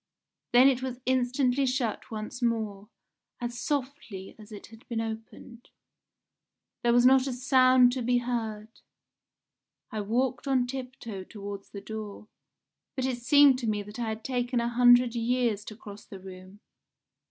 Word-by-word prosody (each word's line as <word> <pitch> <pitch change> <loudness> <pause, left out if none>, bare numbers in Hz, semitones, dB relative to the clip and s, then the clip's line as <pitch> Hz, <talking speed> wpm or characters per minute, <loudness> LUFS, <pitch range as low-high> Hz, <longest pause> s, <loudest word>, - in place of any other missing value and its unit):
Then 245 +2 +7
it 260 -2 +2
was 255 -1 -5
instantly 260 +1 +1
shut 250 -4 -2
once 220 +3 -6
more, 215 -3 -2 0.5
as 240 -1 -5
softly 260 -9 -4
as 215 +1 -14
it 205 - -9
had 225 +1 -16
been 235 -2 -3
opened. 225 +2 -7 1.1
There 240 - +2
was 240 +1 +4
not 265 +1 +5
a 265 - -2
sound 255 -1 +5
to 255 0 -3
be 245 +1 +2
heard. 225 -3 -4 1.1
I 215 - -3
walked 245 +5 -1
on 260 -2 +2
tiptoe 250 -6 -7
towards 200 0 -8
the 200 - -8
door, 215 0 -8 0.7
but 260 - -1
it 255 -2 -2
seemed 280 +1 +5
to 235 - -3
me 210 -1 -1
that 210 +4 -10
I 230 -2 -2
had 220 0 -5
taken 245 -1 -1
a 235 0 0
hundred 245 0 +5
years 235 -3 0
to 215 - -8
cross 205 -1 -11
the 195 - -11
room. 185 +2 -12
240 Hz, 155 wpm, -28 LUFS, 215-255 Hz, 1.1 s, Then